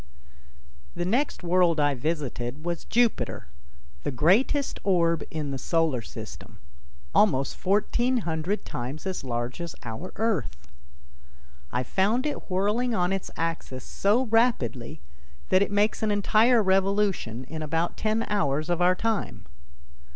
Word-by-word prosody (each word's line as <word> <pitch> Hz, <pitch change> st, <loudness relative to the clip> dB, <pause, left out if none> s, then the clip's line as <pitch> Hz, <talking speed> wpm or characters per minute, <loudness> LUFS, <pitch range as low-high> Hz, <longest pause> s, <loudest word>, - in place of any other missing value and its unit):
The 175 Hz, -, -2 dB
next 245 Hz, +4 st, 0 dB
world 175 Hz, -2 st, +3 dB
I 145 Hz, -1 st, +3 dB
visited 140 Hz, -1 st, -3 dB
was 175 Hz, -1 st, -3 dB
Jupiter, 235 Hz, 0 st, +1 dB, 0.6 s
the -, -, -2 dB
greatest 195 Hz, -, +2 dB
orb 170 Hz, -4 st, +2 dB
in 150 Hz, -3 st, -4 dB
the 135 Hz, -, -4 dB
solar 160 Hz, -7 st, +1 dB
system, -, -, -10 dB, 0.6 s
almost 140 Hz, -11 st, +3 dB
fourteen 240 Hz, +6 st, +1 dB
hundred 165 Hz, +5 st, -2 dB
times 130 Hz, +8 st, -5 dB
as 190 Hz, -5 st, -3 dB
large 120 Hz, +3 st, -3 dB
as 170 Hz, -1 st, -5 dB
our 120 Hz, +10 st, -6 dB
Earth. 120 Hz, -, -2 dB, 1.0 s
I 125 Hz, -, 0 dB
found 210 Hz, -, +1 dB
it 295 Hz, -, -4 dB
whirling 210 Hz, +6 st, +1 dB
on 180 Hz, 0 st, +1 dB
its 195 Hz, -, -3 dB
axis 160 Hz, -6 st, -3 dB
so 210 Hz, +6 st, +1 dB
rapidly 175 Hz, -, +1 dB, 0.5 s
that 185 Hz, -, +4 dB
it 200 Hz, -, +2 dB
makes 205 Hz, +1 st, +1 dB
an 220 Hz, -, +1 dB
entire 215 Hz, +3 st, +4 dB
revolution 190 Hz, -, +1 dB
in 155 Hz, +4 st, -7 dB
about 165 Hz, +3 st, -1 dB
ten 220 Hz, +1 st, 0 dB
hours 155 Hz, -5 st, 0 dB
of 175 Hz, 0 st, 0 dB
our 180 Hz, +1 st, +5 dB
time. 200 Hz, -, -2 dB
175 Hz, 135 wpm, -26 LUFS, 145-210 Hz, 1.0 s, our